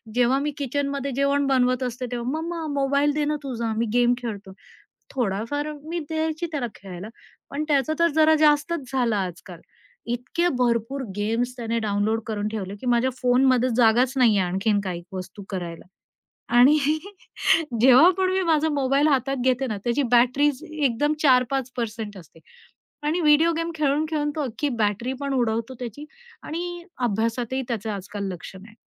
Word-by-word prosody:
जेव्हा 250 +2 +3
मी 295 +1 -1
किचनमध्ये 280 0 -2
जेवण 280 0 +1
बनवत 255 -1 +2
असते 250 0 -3
तेव्हा, 240 0 -3
मम्मा 335 -1 -4 0.2
मोबाईल 280 +2 +2
दे 300 0 0
ना 300 +1 0
तुझा, 235 -4 -3
मी 230 - +1
गेम 245 0 +4
खेळतो. 210 -5 -6 0.6
थोडाफार 250 +6 -2
मी 340 +2 -4
द्यायची 315 +1 -1
त्याला 270 -5 -1
खेळायला, 190 0 -9 0.4
पण 290 +2 -2
त्याच 280 -1 +2
तर 335 - +4
जरा 315 0 +6
जास्तच 295 -1 +2
झालं 240 -5 +1
आजकाल 180 -2 -5 0.5
इतके 260 +9 -1
भरपूर 245 +2 0
गेम्स 230 +4 -1
त्याने 230 -1 -2
डाउनलोड 215 +1 0
करून 210 -1 -2
ठेवले 200 -3 -5
की - - -8
माझ्या 245 +1 +2
फोनमध्ये 255 0 +3
जागाच 245 +2 +4
नाहीये 225 -6 +4
आणखीन 195 +3 +1
काही 175 -2 -4
वस्तू 185 +2 -7
करायला. 175 -4 -5 0.7
आणि 275 +5 +7 1.0
जेव्हा 265 +7 +8
पण 375 -1 +1
मी 380 0 +1
माझा 315 +1 +2
मोबाईल 275 +2 +2
हातात 270 -1 +1
घेते 260 +1 +2
ना, 215 -4 -3
त्याची 240 +4 +1
बॅटरीज 260 +4 +3
एकदम 295 0 +1
4-5% 245 -5 0
असते. 165 -2 -15 0.7
आणि 340 +3 +1
व्हिडिओ 310 +2 +5
गेम 330 0 -2
खेळून 300 0 +1
खेळून 295 -2 -1
तो 305 - -1
अख्खी 285 +5 -2
बॅटरी 210 +5 -1
पण 280 -1 -2
उडवतो 230 -1 -1
त्याची. 250 +5 -7 0.4
आणि 345 +2 -5 0.3
अभ्यासातही 230 +4 -1
त्याचं 220 -2 -2
आजकाल 200 0 -5
लक्ष 180 +2 -9
नाही. 205 +3 -13
250 Hz, 155 wpm, -24 LUFS, 220-290 Hz, 1.0 s, जेव्हा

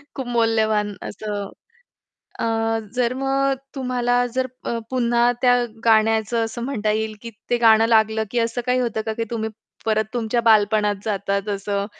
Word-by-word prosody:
खूप 265 -3 -5
मौल्यवान 220 -3 +1
असं. 205 -1 -5 0.9
अ, - - 0 0.5
जर 250 -1 +1
मग 270 +1 +1 0.2
तुम्हाला 245 -2 +1
जर 260 0 +1 0.2
अ, 235 - -1
पुन्हा 240 -1 +2
त्या 250 -1 +5 0.3
गाण्याचं 225 +1 +3
असं 225 +1 -6
म्हणता 220 -5 -1
येईल 215 0 -2
की 235 - -7 0.2
ते 240 - +2
गाणं 225 -1 +5
लागलं, 220 -1 +3
की 245 - 0
असं 230 +1 -1
काही 250 0 +2
होतं 230 -3 -1
का, 220 - -2
की 230 - -2
तुम्ही 220 -1 -2 0.4
परत 220 0 +1
तुमच्या 235 0 0
बालपणात 210 -2 +3
जातात 200 -1 -1
असं 200 0 -2
225 Hz, 155 wpm, -22 LUFS, 215-245 Hz, 0.9 s, त्या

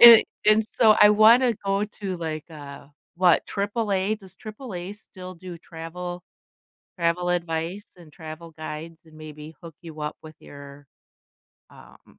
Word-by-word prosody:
and 235 -2 +11 0.2
and 215 +1 +6
so 220 -3 +5
I 210 - +9
wanna 230 +3 +6
go 195 +1 +1
to, 200 -3 -5
like, 160 -1 -5
uh 140 -3 -10 0.3
what, 180 -2 +4
AAA 205 -1 0
Does 190 -2 -15
AAA 210 -5 -7
still 185 -3 -11
do 175 0 -9
travel 175 +2 -7 0.8
travel 175 +1 +1
advice 170 +2 -2
and 165 -3 -15
travel 160 0 -9
guides 155 +1 -8
and 155 -1 -17
maybe 155 0 -10
hook 165 -2 -11
you 160 -2 -9
up 150 0 -3
with 155 0 -11
your, 140 0 -12 0.9
um - - -18
175 Hz, 145 wpm, -25 LUFS, 160-205 Hz, 0.9 s, and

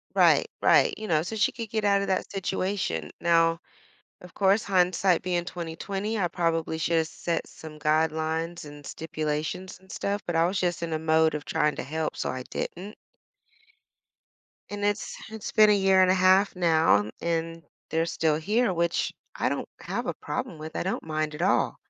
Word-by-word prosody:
Right, - - +4
right, - - +5
you 215 - -5
know, 155 -4 +2
so 220 +6 -5
she 215 - +2
could 230 -3 -6
get 220 -1 -1
out 200 -1 +4
of - - -3
that 190 - 0
situation. 185 - -2
Now, 165 -1 +3 0.6
of 180 -1 -13
course, 200 +2 +3
hindsight 185 -1 +2
being 175 -1 -1
20/20, 195 +6 -4
I 175 -3 +1
probably 165 -2 -1
should've 165 -1 +1
set 170 -1 -3
some 155 -1 -11
guidelines 160 +2 0
and 145 -1 -11
stipulations 155 +3 -4
and 190 0 -15
stuff, 200 0 -2
but 175 - -2
I 165 +1 +4
was 190 +2 -1
just 175 -2 -1
in 165 -1 -3
a 155 - 0
mode 160 0 +3
of 150 - -4
trying 150 +4 0
to - - -3
help, 160 +2 -3
so - - -2
I 130 -1 -5
didn't. 195 +10 -5 1.8
And 205 0 -3
it's 205 0 -1
it's 220 -2 -6
been 215 0 +6
a - - +6
year 190 -1 +4
and 185 0 +5
a - - +3
half 190 +2 +4
now, 160 - +3
and 165 0 -2 0.3
they're 165 +1 +1
still 160 -2 +1
here, 210 +6 +1
which 170 -1 0 0.2
I - - 0
don't - - -3
have - - -4
a - - -2
problem 255 -11 -5
with, 155 +1 -7
I - - -2
don't 190 - -2
mind 155 -1 -2
at 165 - -5
all. 195 - +2
170 Hz, 185 wpm, -27 LUFS, 160-190 Hz, 1.8 s, been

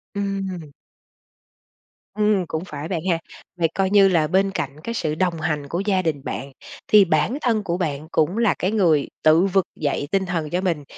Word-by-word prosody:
Ừm. 195 -5 -4 1.4
Ừm, 210 -3 +1
cũng 160 +1 -3
phải 150 -3 -6
bạn 170 -1 -2
ha. 170 -2 +2 0.4
Vậy 165 - +3
coi 190 -1 +1
như 200 -1 +6
là 165 -5 +2
bên 190 +4 +2
cạnh 140 -7 -4
cái 230 - -4
sự 155 -9 -2
đồng 175 -1 0
hành 150 -3 -2
của 170 +5 -3
gia 195 -3 +2
đình 155 -6 -2
bạn, 140 0 -5 0.4
thì 210 -2 +6
bản 165 - +1
thân 225 -4 +1
của 170 -2 -2
bạn 155 -4 -3
cũng 165 +6 +1
là 230 -3 +3
cái 185 - 0
người 170 -9 +2 0.2
tự 160 +4 +5
vực 195 -2 +2
dậy 145 -1 -1
tinh 195 -1 +1
thần 165 -4 -2
cho 180 +3 -1
mình. 170 -6 -1
180 Hz, 195 wpm, -22 LUFS, 155-195 Hz, 1.4 s, như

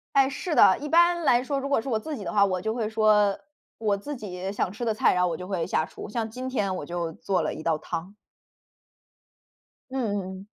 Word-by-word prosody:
诶， 270 -1 +5
是 310 +5 -3
的。 190 - +7
一 295 - -5
般 345 +2 +4
来 250 -5 +4
说， 280 +1 -1
如 275 - -4
果 280 - +2
是 230 - -7
我 225 -4 +1
自 300 +6 -5
己 210 - -7
的 - - -4
话， 205 -1 +5
我 185 -2 0
就 220 +4 -2
会 230 -3 -1
说 215 -2 +3 0.4
我 210 -3 +1
自 285 +9 -6
己 190 -4 -5
想 195 -2 -1
吃 220 +4 -5
的 225 - +1
菜， 215 - +3
然 180 - +2
后 180 - +3
我 165 - -2
就 180 - -8
会 185 -4 -1
下 155 - 0
厨。 190 - -9
像 225 +1 -2
今 250 +3 -6
天 205 -7 -1
我 150 - -5
就 170 -1 -3
做 185 +2 -1
了 - - -2
一 - - -8
道 160 -1 +1
汤。 170 +5 -6 1.8
嗯 235 -6 -1 0.2
嗯。 195 - -12
215 Hz, 255 characters per minute, -26 LUFS, 185-260 Hz, 1.8 s, 的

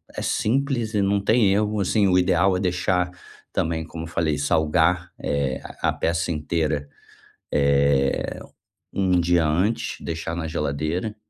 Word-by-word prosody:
é - - -4
simples 120 -1 0
e 105 - +2
não 100 +1 +2
tem 110 0 +3
erro, 105 +1 0
assim, 100 +1 +2
o 90 -1 +3
ideal 90 +1 +3
é - - -2
deixar 90 -1 0 0.4
também, 80 0 -1
como 80 0 -7
eu - - -8
falei: 80 -3 0
salgar, 80 +4 +1
eh, 70 -1 -1 0.2
a - - +2
peça 85 +1 -1
inteira. 75 -2 -1 0.7
Eh, 70 -1 +2 0.5
um 95 -2 +2
dia 85 -1 +2
antes, 90 +9 0
deixar 80 0 -4
na 85 -2 -3
geladeira. 80 +6 -2
85 Hz, 145 wpm, -23 LUFS, 75-100 Hz, 0.7 s, tem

